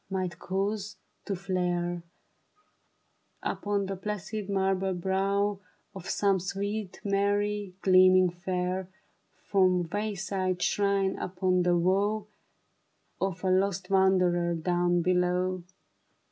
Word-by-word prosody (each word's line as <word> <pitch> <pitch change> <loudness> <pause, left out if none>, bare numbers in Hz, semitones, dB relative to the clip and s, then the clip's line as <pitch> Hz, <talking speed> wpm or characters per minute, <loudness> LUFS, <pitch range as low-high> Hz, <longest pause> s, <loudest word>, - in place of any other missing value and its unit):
Might 185 -2 -3
cause 200 +1 -2 0.3
to 200 - -2
flare 175 -2 -1 1.4
Upon 205 -1 -1
the 195 0 -3
placid, 210 +1 -5
marble 190 -1 +1
brow 195 +2 0 0.3
Of 190 -1 -8
some 200 -2 +2
sweet 200 +2 -4
Mary, 205 -1 0
gleaming 185 -1 +6
fair 180 +1 -3 0.5
From 185 -3 +2
wayside 195 -3 -2
shrine 200 -1 +1
upon 185 0 0
the 175 0 +3
woe 200 +5 +1 0.9
Of 190 -2 -2
a 185 - +2
lost 190 0 0
wanderer 180 -3 +3
down 175 +1 +1
below. 180 0 +1
190 Hz, 100 wpm, -28 LUFS, 180-200 Hz, 1.4 s, gleaming